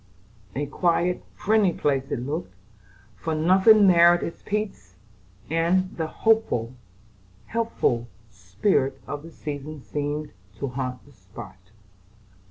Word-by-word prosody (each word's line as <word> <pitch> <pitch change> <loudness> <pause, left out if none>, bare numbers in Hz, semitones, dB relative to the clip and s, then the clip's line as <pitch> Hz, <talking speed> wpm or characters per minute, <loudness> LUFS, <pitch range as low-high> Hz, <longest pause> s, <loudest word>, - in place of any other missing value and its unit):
A 145 +2 -1
quiet, 175 +4 0
friendly 210 -3 +3
place 135 -3 0
it 120 - -2
looked; 140 - -4 0.6
for 160 +9 -3
nothing 190 +6 +6
marred 175 -1 +6
its 165 - -6
peace, 200 - -4 0.5
and 170 +4 +1
the 160 -1 -2
hopeful, 155 - +1 0.7
healthful 225 - 0 0.2
spirit 105 - 0
of 145 - -5
the 165 - -11
season 150 -1 -7
seemed 145 +1 -3 0.2
to 135 +4 -4
haunt 125 0 -4
the 145 - -18
spot. 95 -3 -13
150 Hz, 115 wpm, -25 LUFS, 130-180 Hz, 0.7 s, nothing